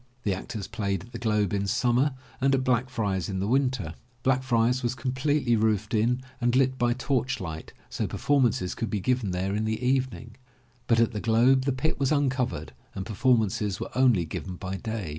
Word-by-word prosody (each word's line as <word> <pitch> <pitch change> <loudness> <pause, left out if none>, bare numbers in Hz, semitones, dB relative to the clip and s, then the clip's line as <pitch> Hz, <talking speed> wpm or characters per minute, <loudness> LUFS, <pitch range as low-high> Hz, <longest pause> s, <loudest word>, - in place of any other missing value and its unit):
The 100 - +1
actors 100 +2 -5
played 100 -4 -2
at 120 - -15
The 115 - -6
Globe 105 -4 +1
in 100 0 0
summer 125 +6 +2 0.3
and 135 +1 +4
at 130 - 0
Black 125 0 +1
jriar's 100 -7 -1
in 95 -1 -2
the 95 - -1
winter. 125 - 0 0.3
Blackfriar's 125 -1 +2
was 120 0 -1
completely 130 +1 +1
roofed 110 -1 +1
in 120 +4 +1 0.2
and 120 0 +2
lit 130 0 +3
by 120 0 +3
torchlight 125 - -2 0.2
so - - -3
performances 125 -10 +1
could 115 - -3
be 105 - -1
given 125 0 0
there 95 +2 -1
in 110 +1 -1
the 110 0 -1
evening, 125 -3 -1 0.5
but 115 -1 +4
at 115 0 +3
The 105 -3 -4
Globe 125 +4 +4
the 140 - +2
pit 135 +5 -1
was 135 0 +1
uncovered 130 - 0 0.2
and 95 - -4
performances 110 -3 +1
were - - -5
only 125 -9 +4
given 90 +4 -6
by 95 +1 -5
day. 110 -5 -4
115 Hz, 190 wpm, -27 LUFS, 100-130 Hz, 0.5 s, and